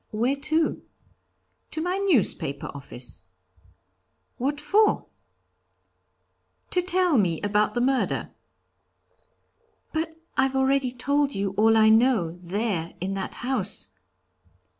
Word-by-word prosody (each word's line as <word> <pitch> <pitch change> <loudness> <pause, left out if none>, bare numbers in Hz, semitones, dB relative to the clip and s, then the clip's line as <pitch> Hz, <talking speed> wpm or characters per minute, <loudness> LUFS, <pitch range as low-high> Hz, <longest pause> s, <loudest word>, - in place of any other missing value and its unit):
'Where 240 +5 0
to?' 315 +3 0 0.9
'To - - -3
my 360 +4 -1
newspaper 195 - 0
office.' 130 -3 -6 1.2
'What 280 +3 -1
for?' 405 +9 +2 1.7
'To 360 - +2
tell 360 -5 +4
me 170 -5 +1
about 210 +2 +1
the 240 - +1
murder.' 265 +1 0 1.6
'But 320 0 -3 0.2
I've 270 0 +1
already 265 -1 +2
told 280 +3 0 0.2
all 225 +2 +4
I 220 0 +6
know, 220 -6 +3
there, 180 0 -3
in 190 +3 -3
that 195 0 -4
house.' 210 - 0
250 Hz, 100 wpm, -25 LUFS, 200-295 Hz, 1.7 s, I